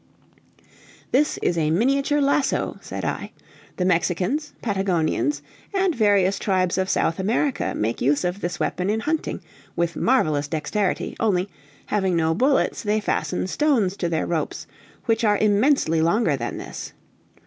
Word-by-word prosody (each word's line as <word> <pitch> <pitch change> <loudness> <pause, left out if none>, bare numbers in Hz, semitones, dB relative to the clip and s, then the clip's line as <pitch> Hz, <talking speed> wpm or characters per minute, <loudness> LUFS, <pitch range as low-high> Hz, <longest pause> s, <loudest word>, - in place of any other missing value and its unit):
"This 295 +4 +2
is 170 -1 +1
a 155 -1 +1
miniature 275 - +2
lasso," 280 0 +1
said - - -6
I; - - -4 0.4
"the 180 - 0
Mexicans, 185 - 0
Patagonians, 195 - 0 0.3
and 385 -2 +2
various 200 -5 +3
tribes 185 -2 +1
of 190 0 0
South 165 - +1
America, 240 +8 0
make 110 +2 -2
use 145 +2 +2
of 180 +3 -2
this 175 0 -3
weapon 180 +2 -1
in 220 +1 0
hunting, 310 +5 -2 0.3
with 170 0 -1
marvelous 155 - +2
dexterity, 165 +7 -2
only, 195 -3 +1 0.4
having 190 -4 0
no 160 -1 +2
bullets, 265 - +1
they 210 0 +1
fasten 185 -3 -1
stones 220 -3 +1
to 175 - -1
their 160 -2 0
ropes, 165 -2 -3 0.4
which 225 -1 +1
are 210 -2 +4
immensely 210 - +3
longer 170 -1 +2
than 120 -3 -4
this. - - -7
195 Hz, 145 wpm, -23 LUFS, 170-240 Hz, 0.4 s, are